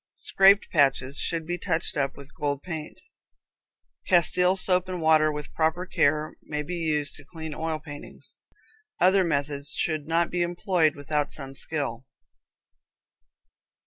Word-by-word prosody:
Scraped 195 +2 +5
patches 135 -3 +2
should 165 -2 0
be 175 +2 -3
touched 170 -2 0
up 140 -2 -1
with 140 0 -12
gold 145 -1 -3
paint. 160 -4 -6 1.1
Castile 180 +1 +4
soap 185 -1 +1
and 180 -1 -3
water, 155 -1 +4
with 150 -1 -7
proper 160 +3 0
care, 155 -3 +1
may 150 -1 -4
be 155 - -6
used 155 -4 -1
to 145 - -12
clean 160 0 -7
oil 160 +1 -2
paintings. 150 -2 -11 0.6
Other 190 +2 +5
methods 140 -3 -2
should 155 -3 -1
not 165 +1 +1
be 175 - 0
employed 175 -2 +1
without 145 0 -2
some 135 -2 -6
skill. 135 -4 -4
155 Hz, 140 wpm, -26 LUFS, 145-175 Hz, 1.1 s, Scraped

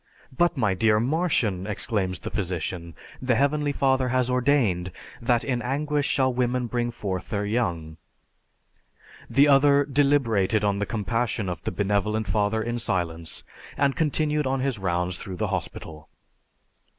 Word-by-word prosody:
'" - - -29
"But, 175 +1 +2
my 110 -6 +2
dear 105 +3 +3
Martian," 120 - 0
exclaims 100 -3 0
the - - -7
physician, 90 -4 -3 0.3
"the 130 -2 +1
Heavenly 145 +3 +1
Father 130 -2 +1
has 125 0 +1
ordained 120 -9 +1 0.3
that 120 0 +2
in 125 -3 -1
anguish 145 +3 -1
shall 130 -2 +2
woman 125 0 0
bring 120 0 -1
forth 95 -5 -4
her 105 -1 -1
young." 85 -8 -2 1.3
The 140 +2 +5
other 140 0 +5
deliberated 130 -8 +2
on 100 -1 +1
the 105 - -2
compassion 115 -1 -1
of 90 - -5
the - - -1
Benevolent 105 +3 0
Father 110 +1 +1
in 120 +1 -2
silence, 85 -7 -2 0.3
and 140 -1 +2
continued 150 -2 +1
on 135 0 0
his 130 -5 -1
rounds 90 -1 -1
through 95 -2 -7
the - - -1
hospital. 80 -1 -5
115 Hz, 150 wpm, -25 LUFS, 95-135 Hz, 1.3 s, The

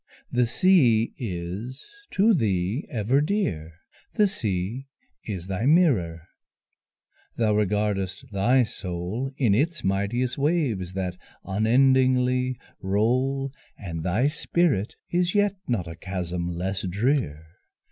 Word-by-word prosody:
the 125 -1 +2
sea 120 -8 +4
is 100 +4 -5 0.2
to 215 +4 +4
thee 105 - 0
ever 120 +5 +1
dear! 145 - -1 0.4
The 210 - +5
sea 110 - -3 0.4
is 95 -6 -5
thy 95 +6 -2
mirror, 105 - +3 1.1
thou 110 -2 +2
regardest 105 -2 0
thy 120 +6 +3
soul 95 +4 -4
In 120 -7 +3
its 165 +10 0
mighteous 105 +7 0
waves 135 - 0
that 90 -2 -3 0.3
unendingly 125 +3 +3 0.2
roll, 130 +7 0 0.2
And 85 -4 -5
thy 95 +10 +1
spirit 150 - 0 0.2
is 175 +1 +1
yet 205 -1 +3
not 105 -9 -1
a 80 - -6
chasm 90 -1 -4
less 95 +3 -2
drear. 100 - 0
110 Hz, 110 wpm, -25 LUFS, 95-135 Hz, 1.1 s, The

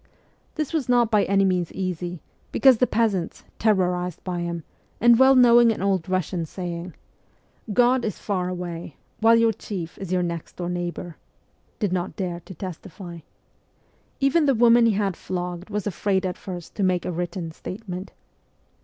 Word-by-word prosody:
This 310 0 -3
was 295 -6 -1
not 240 -2 +3
by 210 -2 +4
any 195 0 +3
means 180 -3 0
easy, 180 -2 -4 0.3
because 265 -3 +5
the 250 - +4
peasants, 210 -7 0 0.2
terrorized 180 -5 +1
by 180 -2 -3
him, 170 -1 -3 0.4
and 235 0 +6
well 265 +1 +7
knowing 240 -2 +7
an 210 - -3
old 190 -4 +1
Eussian 185 -2 -1
saying, 175 0 -6 0.4
' - - -39
God 245 +3 +3
is 210 - -2
far 185 -3 -2
away, 175 -3 -6 0.2
while 225 +1 +6
your 230 -1 +4
chief 180 -5 -6
is 190 -2 -6
your 180 -1 +2
next 170 -2 -5
door 175 -1 -4
neighbour,' 175 -1 -4 0.6
did 205 -4 -1
not 180 0 -2
dare 180 -3 -3
to 180 +2 -12
testify. 175 0 -8 1.0
Even 285 +3 +3
the 275 - +4
woman 235 0 +6
he 225 - +3
had 200 -2 0
flogged 180 +1 -5
was 210 -2 -3
afraid 195 -1 0
at 180 -1 -2
first 180 -3 -8
to - - -4
make 185 -2 +1
a - - -2
written 175 0 -4
statement. 185 +2 -7
185 Hz, 170 wpm, -24 LUFS, 175-225 Hz, 1.0 s, well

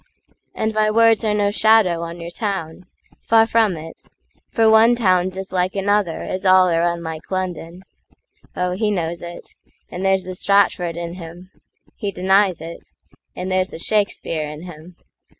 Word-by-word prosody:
And 220 0 -1
my 215 0 +2
words 225 0 +4
are 215 -1 +1
no 205 -1 +1
shadow 215 -6 +3
on 170 +1 -6
your 170 0 -7
town—Far 195 +3 -2
from 220 -5 +1
it; 160 +1 -11 0.4
for 225 -2 +2
one 220 +2 +6
town's 185 -4 +1
as 190 0 -7
like 185 0 0
anotherAs 195 -2 -1
all 185 -1 +5
are 165 -1 +1
unlike 170 -2 -3
London. 180 -1 -4 0.7
Oh, 180 0 -1
he 210 +4 -1
knows 170 -4 -2
it,—And 175 +1 -10
there's 190 -1 +2
the 185 0 -7
Stratford 180 -3 +1
in 170 0 -5
him; 175 +2 -11 0.5
he 205 - -3
denies 190 0 +2
it, 165 +1 -9 0.5
And 185 +1 -5
there's 185 0 +1
the - - -10
Shakespeare 165 -5 -1
in 150 +2 -9
him. 175 0 -12
185 Hz, 150 wpm, -20 LUFS, 170-205 Hz, 0.7 s, one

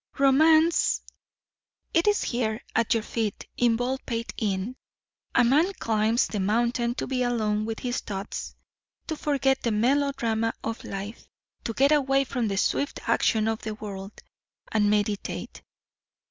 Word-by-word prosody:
Romance 315 +4 +4 0.9
it 335 +4 +3
is 415 0 +3
here 225 -3 -1 0.2
at 230 0 +2
your 225 - 0
feet 220 -3 -3
in 240 -2 +3
Baldpate 245 -1 -3
Inn. 205 +2 -2 0.6
A - - +6
man 300 +10 +4
climbs 225 - +1
the 210 - -4
mountain 235 +4 +1
to - - -3
be 255 -1 -1
alone 215 -3 0
with 225 0 -4
his 245 -1 -1
thoughts, 200 0 -6 0.5
to 315 - -3
forget 270 -3 +1
the 235 - 0
melodrama 230 -1 +1
of 225 +1 -4
life, 200 +3 -7 0.4
to 230 - -2
get 275 +6 +3
away 275 -2 +3
from 250 -3 -2
the 195 -1 -2
swift 280 +8 0
action 220 -1 +2
of 225 0 -1
the 215 -1 -4
world, 200 -2 -8 0.5
and 210 -2 +3
meditate. 205 -1 -2
230 Hz, 145 wpm, -26 LUFS, 215-270 Hz, 0.9 s, A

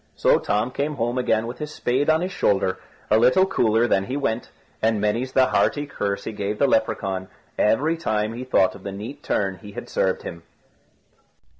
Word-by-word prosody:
So - - +4
Tom 105 +4 0
came 145 +3 -2
home 120 0 -1
again 110 -3 +1
with 120 +2 -7
his 150 0 -5
spade 135 +1 0
on 160 +1 +4
his 185 +1 -2
shoulder, 95 - +1 0.3
a 110 - +6
little 130 +11 +5
cooler 115 - +2
than 95 -3 +2
he 130 +5 -3
went, 120 -4 -2 0.3
and 110 -1 +2
many's 115 +5 -1
the 130 - +5
hearty 145 +3 +1
curse 100 -7 -3
he - - -4
gave 105 0 -3
the 140 - +3
Lepracaun 95 -6 0 0.3
every 150 +10 +2
time 110 -8 -1
he 120 +2 -5
thought 110 -7 +3
of 100 - -12
the 100 - -5
neat 110 +9 -7
turn 95 -2 -1
he 105 -2 -11
had - - -8
served 95 -1 0
him. 85 -1 -7
115 Hz, 195 wpm, -23 LUFS, 105-130 Hz, 0.3 s, a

